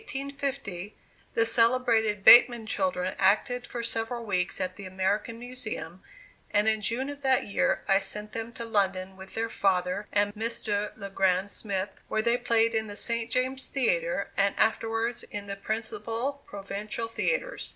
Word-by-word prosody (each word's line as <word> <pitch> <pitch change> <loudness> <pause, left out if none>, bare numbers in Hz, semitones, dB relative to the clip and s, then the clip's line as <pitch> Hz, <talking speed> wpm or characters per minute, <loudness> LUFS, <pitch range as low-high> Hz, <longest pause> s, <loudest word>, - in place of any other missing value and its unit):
In - - -20
1850, 275 - -4 0.4
the 230 - +4
celebrated 230 -3 +3
Bateman 240 0 +8
children 215 -7 -1
acted 230 +6 +2
for 235 -1 -5
several 230 +1 -2
weeks 185 -3 -1
at 185 -1 -2
the 195 0 -8
American 195 +5 -1
Museum 230 -8 -7 0.5
and 210 +1 +2
in 220 -1 +2
June 245 +5 0
of 285 0 -10
that 265 -1 +3
year 200 - 0
I 195 0 +5
sent 210 +2 -7
them 225 0 -5
to 235 - -6
London 190 -4 0
with 190 0 -12
their 225 +1 0
father 190 -1 0
and 205 0 +2
Mr. 210 -2 -1
Le 200 -2 -7
Grand 190 +1 +1
Smith, 200 -2 -2 0.2
where 220 0 0
they 235 +1 +3
played 230 -2 +2
in 220 -1 0
the 205 - -7
St. 230 +1 -1
James 260 +2 -1
Theatre, - - 0
and 200 0 +2
afterwards 225 +1 +1
in 205 -1 -7
the 200 0 -5
principal 225 +6 -3
provincial 205 +3 -4
theatres. - - -1
220 Hz, 160 wpm, -28 LUFS, 200-240 Hz, 0.5 s, Bateman